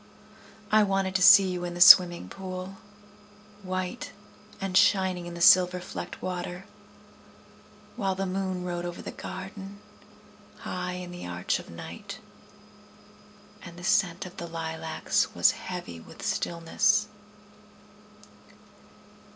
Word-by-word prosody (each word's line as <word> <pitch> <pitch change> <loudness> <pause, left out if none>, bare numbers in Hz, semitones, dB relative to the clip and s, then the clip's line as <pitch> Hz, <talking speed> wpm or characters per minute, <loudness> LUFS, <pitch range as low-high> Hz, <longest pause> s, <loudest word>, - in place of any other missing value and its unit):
I 215 0 +5
wanted 195 -2 0
to 190 - 0
see 195 0 +8
you 180 -1 -4
in 175 0 -5
the - - -7
swimming 175 - +8
pool, 185 - -8 0.8
White 185 +4 -5 0.5
and 195 -1 -4
shining 190 -2 +3
in 175 - -8
the 170 - -7
silver 180 +1 +6
flecked 180 - -8
water. 180 0 -5 1.3
While 195 -5 -1
the 195 +1 -2
moon 185 -1 -3
rode 175 -1 -4
over 175 0 -6
the - - -6
garden, 195 +1 -9 0.8
High 180 0 -4
in 180 -1 -7
the 175 - -8
arch 90 0 -2
of - - -12
night, 200 - -9 1.4
And 170 -1 -11
the 175 - -11
scent 190 -2 +1
of 180 - -11
the 170 - -6
lilacs 160 -1 -2
was - - +5
heavy 85 -1 -7
with - - -11
stillness. 210 +6 +1
180 Hz, 125 wpm, -27 LUFS, 175-195 Hz, 1.4 s, see